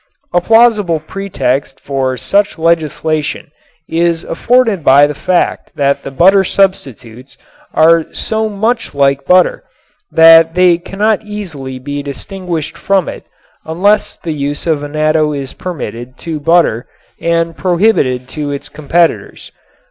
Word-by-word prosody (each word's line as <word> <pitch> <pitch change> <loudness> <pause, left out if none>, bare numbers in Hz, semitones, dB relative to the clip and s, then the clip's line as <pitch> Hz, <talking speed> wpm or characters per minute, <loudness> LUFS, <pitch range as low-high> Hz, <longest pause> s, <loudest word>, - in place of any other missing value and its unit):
A 175 - +3
plausible 215 -6 +3
pretext 145 -6 -3
for 135 -2 -2
such 200 +6 0
legislation 160 -2 -1 0.4
is 170 0 0
afforded 230 -2 +1
by 140 +2 +6
the 150 - -3
fact 175 +4 -1
that 140 -1 0
the - - -7
butter 190 +8 +4
substitutes 135 - -2 0.4
are 165 0 +3
so 220 0 -2
much 220 -1 -2
like 140 0 +1
butter 180 0 +3 0.5
that 165 0 +6
they 180 -2 +4
cannot 205 +4 -1
be 215 -1 -15
easily 150 -11 -7 0.2
distinguished 160 +3 -6
from 195 -2 +1
it - - -8 0.4
unless 200 +6 0
the 165 - -5
use 145 0 -4
of 160 -4 0
annatto 155 +1 0
is 140 -2 -5
permitted 130 -7 -7
to 160 -2 -5
butter 165 -7 +1 0.3
and 165 0 0
prohibited 170 - +1
to 150 +1 -5
its 145 +1 -6
competitors. 165 +4 -1
165 Hz, 125 wpm, -13 LUFS, 145-185 Hz, 0.5 s, by